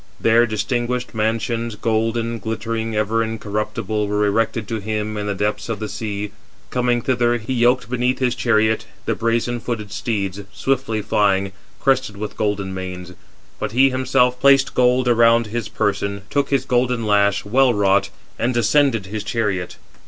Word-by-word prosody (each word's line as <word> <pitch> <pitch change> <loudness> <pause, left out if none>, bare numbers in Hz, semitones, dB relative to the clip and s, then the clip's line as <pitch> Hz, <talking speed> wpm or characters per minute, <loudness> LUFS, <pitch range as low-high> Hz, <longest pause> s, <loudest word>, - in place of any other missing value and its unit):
There 115 +1 +4
distinguished 120 +3 -2
mansions, 115 +1 -1
golden, 115 +1 -1
glittering, 115 +1 -3
ever 110 +2 +1
incorruptible, 105 -1 -2
were 105 +1 +1
erected 110 +1 0
to 115 - -2
him 110 +1 -3
in 105 0 -3
the 100 - -1
depths 105 +3 -2
of 115 - -1
the 110 - -4
sea. 105 -1 -4 0.4
Coming 125 -1 +1
thither, 120 -2 +2
he 115 +3 -4
yoked 125 +1 +2
beneath 125 +1 0
his 125 -2 +1
chariot 110 -3 +1 0.2
the - - +1
brazen 115 +1 0
footed 115 -4 -4
steeds, 100 -3 -2
swiftly 130 -5 -1
flying, 100 -2 +1 0.3
crested 130 -6 +1
with 105 +1 -5
golden 100 -2 -1
manes. 90 -1 -6 0.5
But 110 0 -3
he 135 +2 +5
himself 125 -1 +2
placed 135 0 +5
gold 125 0 +3
around 115 -1 +4
his 110 0 -4
person, 100 -1 -1
took 140 -1 +1
his 135 -2 +1
golden 125 -2 +1
lash, 100 -1 +2
well 130 +5 +4
wrought, 100 -2 +2 0.3
and 120 +1 0
ascended 120 -2 +3
his 105 +2 -5
chariot. 105 -5 -2
115 Hz, 155 wpm, -20 LUFS, 105-120 Hz, 0.5 s, he